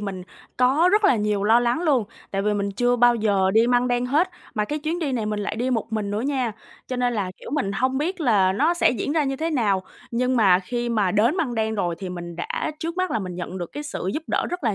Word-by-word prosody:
mình 195 -3 -5 0.3
có 270 +8 +4
rất 425 0 +3
là 390 - +5
nhiều 210 -1 0
lo 225 +3 +5
lắng 240 +7 0
luôn. 280 -9 +2 0.3
Tại 195 0 -1
vì 210 0 +1
mình 200 0 -1
chưa 245 +4 +1
bao 240 0 +5
giờ 200 -4 +2
đi 225 +1 +5
Măng 245 0 +2
Đen 245 0 0
hết. 310 +8 +2 0.2
Mà 210 -1 0
cái 300 +6 -3
chuyến 320 +4 -2
đi 295 -6 -2
này 225 -4 -1
mình 210 -1 -2
lại 205 +2 -3
đi 250 +2 -1
một 225 -2 -2
mình 210 -2 -2
nữa 210 +2 -1
nha, 260 -4 -1 0.3
cho 255 - -4
nên 245 -1 +1
là, 195 -4 -2
kiểu, - - -10
mình 270 -9 -1
hông 260 +5 0
biết 350 +4 -2
là 200 -9 +3
nó 310 - +2
sẽ - - +3
diễn 250 +4 -2
ra 310 -3 +2
như 270 0 -2
thế 325 +3 -2
nào, 210 -10 +1 0.3
nhưng 250 +2 0
mà 190 -5 +5
khi 240 +5 -3
mà 210 -5 +1
đến 230 - +2
Măng 285 -9 -1
Đen 220 -1 -1
rồi 175 -4 -1
thì 190 -2 -5
mình 175 -1 -7
đã 170 - -3
trước 330 +2 -4
mắt 370 0 0
là - - 0
mình 185 -3 -5
nhận 180 +1 -5
được 175 - -6
cái 295 - -5
sự 280 -10 -4
giúp 315 - -2
đỡ - - 0
rất 355 -6 -4
là 215 -3 +2
240 Hz, 275 wpm, -23 LUFS, 205-275 Hz, 0.3 s, là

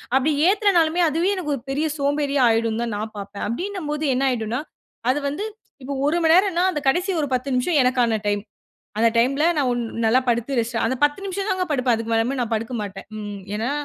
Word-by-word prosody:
அப்பிடி 275 +3 +3 0.2
ஏத்தனாலுமே 360 -5 +3
அதுவே 335 +6 +1
எனக்கு 300 -5 -2
ஒரு 240 - -8
பெரிய 295 +3 0
சோம்பேறியா 285 -1 +1
ஆயிடும்ன்னு 225 0 +1
தான் 230 - -3
நான் 215 +1 -5
பார்ப்பேன். 200 0 -6
அப்பிடீன்னம்போது 310 - -3
என்ன 270 +2 +1
ஆயிடுன்னா, 235 +2 -2 0.5
அது 290 - -1
வந்து 355 +9 -4 0.4
இப்போ 280 +2 -4
ஒரு 325 +4 +2
மணி 320 - +5
நேரன்னா, 370 -2 +3
அந்த 300 - -2
கடைசி 360 +7 +1
ஒரு 290 - -1
10 255 +2 -3
நிமிஷம் 275 +5 +2
எனக்கான 245 -3 +2
டைம். 205 0 +1 0.6
அந்த 230 - +5
டைம்ல 275 +6 +2
நான் 275 -4 +2
ஒன் 240 0 0 0.2
நல்லா 230 +4 +4
படுத்து 240 +3 0
ரெஸ்ட் 235 +1 -1
அந்த 260 - -1
10 290 +6 +1
நிமிஷம் 390 +1 -3
தாங்க 375 -1 0
படுப்பேன். 255 -4 +2
அதுக்கு 225 0 -4
மேலயுமு 230 +4 +1
நான் 240 -2 -2
படுக்கமாட்டேன். 215 -3 -4
ம், 205 -1 -6 0.2
ஏன்னா 225 +5 -1
265 Hz, 195 wpm, -22 LUFS, 230-315 Hz, 0.6 s, மணி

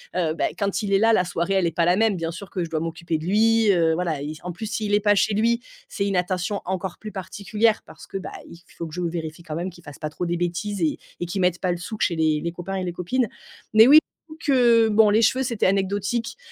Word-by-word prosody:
heu, 165 -4 +1
bah, - - 0
quand 200 0 -1
il 200 -1 -1
est 195 - +5
là, 225 +2 +4
la 185 - +3
soirée 175 +2 -1
elle 190 -2 +2
est - - -1
pas 170 - +2
la 175 +1 +4
même. 220 -2 +3
Bien 165 -2 -3
sûr 185 +3 -9
que 180 - -2
je 165 - -5
dois 160 -1 -1
m'occuper 165 0 -3
de 155 - -7
lui, 220 +2 +4
heu, 165 -3 +3
voilà, 165 -4 -2
il 145 +1 -4
s - - -11
en 180 - -4
plus, 215 +6 -6
s'il 210 -1 -2
est 205 - +5
pas 205 0 +3
chez 205 - +2
lui, 230 +3 +2 0.3
c'est 200 - -2
une 195 - -1
attention 185 +3 -1
encore 185 0 -3
plus 215 - -8
particulière 210 +3 0
parce - - -13
que, - - -5
bah, 190 - -7 0.2
il 170 - -13 0.2
faut 170 - -4
que 155 - -12
je 180 - -4
vérifie 165 -1 -4
quand 155 -2 -6
même 175 +3 -3
qu'il 175 0 -17
fasse 145 -3 -11
pas 155 - -3
trop 165 +4 -4
des 175 0 -1
bêtises 175 +3 -2
et 160 -2 +1 0.2
et 175 - -2
qu'il 180 +3 -3
mette 180 -1 +2
pas 185 - 0
le 175 - -2
souk 205 +5 -7
chez 170 - +2
les 155 -2 +2
les 170 - -2
copains 175 +2 -5
et 190 - -2
les 175 - -3
copines. 230 +9 0 0.5
Mais, 220 +2 +8
oui, 290 +3 +9 0.3
j'avoue 310 - -11
que, 240 -5 +5
bon, 215 0 +5
les 215 +2 +4
cheveux 255 +3 +3
c'était 235 -4 -1
anecdotique, 200 - -1
185 Hz, 280 wpm, -23 LUFS, 170-215 Hz, 0.5 s, oui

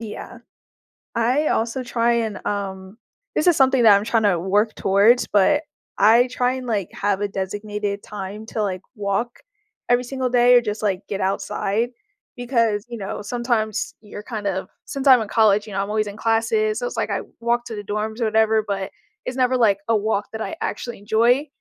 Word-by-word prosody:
Yeah. 220 -2 -8 0.8
I 250 +6 +2
also 230 +3 -1
try 235 -1 +1
and, 225 -3 -2
um 195 -1 -4 0.4
this 305 - +1
is 345 - +5
something 265 -2 +4
that 210 -3 +8
I'm 200 - -2
trying 225 0 +1
to 195 -5 +3
work 205 +4 +1
towards, 205 +6 +4
but 210 +10 +3 0.3
I 230 +4 +5
try 250 0 +1
and, 255 -1 -6
like, 205 -6 -1
have 205 -1 -1
a 205 - +1
designated 205 +1 -4
time 210 +1 -7
to, 220 - -3
like, 190 -3 -2
walk 210 +3 -2 0.5
every 245 +1 +3
single 260 0 -2
day 245 0 +5
or 245 - +7
just, 215 -1 -4
like, 195 -3 0
get 200 - -3
outside 200 +3 -1 0.5
because, 230 -4 0
you 235 - -6
know, 195 +1 -5
sometimes 230 -1 -2
you're 205 -1 -9
kind 215 -2 -6
of 190 -1 -3 0.2
since 275 0 -4
I'm 255 -3 +8
in 220 - -4
college, 210 -1 +3
you 205 - -8
know, 195 - 0
I'm 200 - -4
always 215 0 0
in 205 - -7
classes, 225 -1 +1
so, 245 - -3
it's 245 - -7
like 225 - -1
I 200 - -1 0.2
walk 235 +1 0
to 225 - -6
the 205 - -6
dorms 215 +3 -3
or - - +2
whatever, 220 0 +3
but 195 -1 -3 0.3
it's 255 - -4
never, 255 0 +2
like, 210 -5 +3
a 225 - +3
walk 205 -1 -1
that 220 - -6
I 325 - -4
actually 240 -3 -4
enjoy, 230 +7 +2
220 Hz, 200 wpm, -22 LUFS, 205-240 Hz, 0.8 s, that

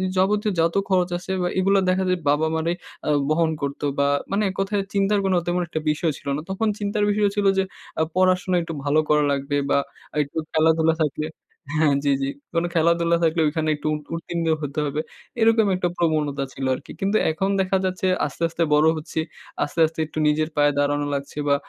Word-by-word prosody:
যাবতীয় 205 +3 +2
যত 165 +1 +2
খরচ 180 -2 +2
আছে 180 +2 -7
বা 180 - +1
এগুলো 195 +1 +3
দেখা 185 +1 +2
যায় 180 -1 +1
বাবা 150 +2 +2
মারাই 165 +2 0 0.3
আ - - +1 0.2
বহন 160 +1 +2
করত 140 0 -3 0.2
বা 140 0 +3 0.2
মানে 200 +2 +1
এককথায় 195 +1 -1
চিন্তার 200 +1 +2
কোনো 190 -1 +2
তেমন 175 +1 0
একটা 160 - -3
বিষয় 155 +2 0
ছিল - - -14
না। 150 - -3
তখন 195 +4 -1
চিন্তার 205 0 -1
বিষয় 205 0 +2
ছিল 205 -1 0
যে 190 - +3 0.4
আ - - +4
পড়াশোনা 185 0 +2
একটু 165 0 -5
ভালো 145 +2 +2
করা 150 0 +4
লাগবে 140 +1 -1
বা - - +4 0.4
একটু 145 +2 -5
খেলাধুলা 160 0 +3
থাকবে 155 0 0 0.5
হ্যাঁ 155 -2 +3
জি, 140 - +2
জি। 135 - 0 0.2
কোনো 170 +1 +1
খেলাধুলা 170 0 +3
থাকলে 165 0 +2
ওইখানে 155 +1 -1
একটু 150 - -5
উ - - +1 0.2
উত্তীর্ণ 170 0 -3 0.2
হতে 145 +1 -3
হবে। 145 +2 -1 0.4
এরকম 225 -1 +4
একটা 180 -1 0
প্রবণতা 150 -4 0
ছিল 135 - -4
আরকি। - - -11
কিন্তু 200 +2 +1
এখন 190 +5 -1
দেখা 190 0 +1
যাচ্ছে 185 0 -1 0.2
আস্তে, 150 +3 -5
আস্তে 170 0 -1
বড় 150 +1 +5
হচ্ছি। 155 +1 -4 0.4
আস্তে, 145 - -5
আস্তে 160 +1 -6
একটু 155 - -11
নিজের 155 +1 +1
পায়ে 145 -1 +4
দাঁড়ানো 145 0 +1
লাগছে 140 +1 -5
বা 140 - +4
165 Hz, 195 wpm, -23 LUFS, 150-185 Hz, 0.5 s, বড়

